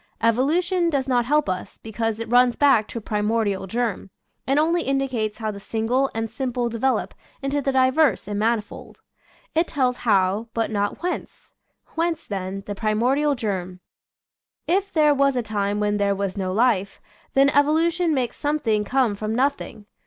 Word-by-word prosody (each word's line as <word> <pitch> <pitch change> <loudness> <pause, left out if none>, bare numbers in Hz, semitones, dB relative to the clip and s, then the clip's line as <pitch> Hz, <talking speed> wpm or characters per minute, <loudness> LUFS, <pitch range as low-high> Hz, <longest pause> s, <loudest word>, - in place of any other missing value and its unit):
Evolution 330 +10 +2
does 275 -4 -1
not 245 -2 +2
help 300 +3 +2
us, 185 -1 -4
be 220 - -10
cause 225 0 -2
it 230 - -4
runs 245 +1 +4
back 265 -7 +4
to - - -7
a - - -4
primordial 210 -2 -1
germ, 225 -2 -2 0.4
and 275 +2 +2
only 335 +3 +2
indicates 260 -7 -1
how 220 -2 -3
the 200 - -9
single 230 +6 0
and 225 0 -1
simple 245 0 -2
de 230 0 -5
velop 265 +2 0 0.3
into 280 +1 0
the 275 - 0
diverse 260 -2 +2
and 205 -1 -3
manifold. 225 0 -2 0.5
It 330 +2 +2
tells 255 -4 0
How, 200 0 +1
but 225 -1 -1
not 205 +7 -2
Whence. 360 - -5 0.4
Whence, 330 0 -1
then, 195 0 -5
the 205 - -4
primordial 245 +8 +1
germ? 185 -6 -4 0.9
If 390 +3 0
there 300 -2 +4
was 275 -1 +2
a 245 - 0
time 205 -1 -1
when 210 0 0
there 200 -1 +1
was 195 0 -3
no 190 -2 -2
life, 200 -2 +1 0.4
then 275 +1 +5
evolution 320 +4 +2
makes 255 -5 -1
some 295 +1 0
thing 220 -7 0
come 250 0 +1
from 215 +2 -3
nothing. 265 -5 -1
235 Hz, 175 wpm, -23 LUFS, 210-275 Hz, 0.9 s, then